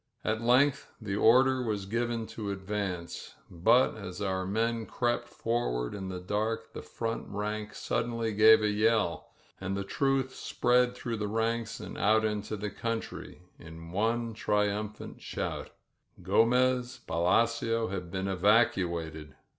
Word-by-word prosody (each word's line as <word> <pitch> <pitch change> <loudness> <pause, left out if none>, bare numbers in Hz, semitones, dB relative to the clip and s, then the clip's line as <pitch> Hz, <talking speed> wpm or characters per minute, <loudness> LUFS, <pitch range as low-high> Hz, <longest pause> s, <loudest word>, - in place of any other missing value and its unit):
At 110 +1 0
length 130 +4 +3
the 105 -4 -3
order 130 +4 +5
was 105 -5 -2
given 115 +2 -1
to 105 -3 -4
advance, 95 -3 -4 0.2
but 115 +9 +4
as 90 -4 -7
our 95 -2 -1
men 115 +2 -1
crept 120 -1 -1
forward 85 - -2
in 95 -2 -5
the 90 -1 -5
dark 105 +1 -2
the - - -6
front 115 0 -4
rank 105 +1 -4
sud 115 - -1
denly 115 -2 -2
gave 110 +1 +7
a 105 - +3
yell, 105 -4 +1 0.3
and 95 0 -3
the 100 - -2
truth 135 +5 0
spread 125 0 +1
through 120 -2 -4
the 105 -1 -2
ranks 115 +2 -1
and - - -7
out 110 +1 +3
into 105 0 -2
the 105 0 -4
country, 115 -5 -5 0.2
in 80 +1 -11
one 115 +4 0
triumphant 105 0 -2
shout. - - -4 0.5
Gomez 125 +5 +2
Palacio 115 +6 +1
had 90 -2 -5
been 95 +2 -3
evacuated! 90 - +1
105 Hz, 140 wpm, -30 LUFS, 95-115 Hz, 0.5 s, gave